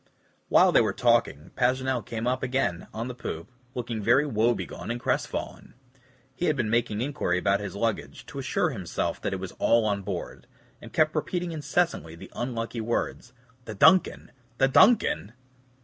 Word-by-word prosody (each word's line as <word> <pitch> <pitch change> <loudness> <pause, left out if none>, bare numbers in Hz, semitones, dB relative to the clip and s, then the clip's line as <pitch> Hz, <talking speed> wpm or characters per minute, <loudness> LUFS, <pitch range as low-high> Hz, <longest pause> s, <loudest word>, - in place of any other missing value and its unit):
While - - +6
they - - +5
were - - 0
talking, 75 +2 +1
Paganel 130 -1 +1
came 115 +1 -5
up 125 +1 0
again 130 -10 -1
on 115 +2 -4
the 125 - -5
poop, 115 -4 -6 0.2
looking 120 -3 -3
very 125 +8 +4
woebegone 120 -3 -1
and 120 +1 -2
crestfallen. - - -3 0.6
He 175 - -2
had 155 - +2
been 115 -5 -1
making 115 -2 0
inquiry 135 -9 -1
about 100 +2 +2
his 100 -1 -6
luggage, 115 +1 -3
to - - -8
assure - - 0
himself - - -3
that - - -2
it 95 - -3
was 95 -1 -6
all 115 -1 +3
on 100 -2 0
board, 95 -3 -6 0.3
and - - -11
kept 155 0 +2
repeating 175 +3 -2
incessantly 160 - -1
the 85 - -12
unlucky 115 -1 -3
words, 120 +2 -3 0.3
"The 110 - -7
DUNCAN! 185 - +4 0.3
the 135 - +4
DUNCAN!" 190 - +4
120 Hz, 165 wpm, -27 LUFS, 105-130 Hz, 0.6 s, While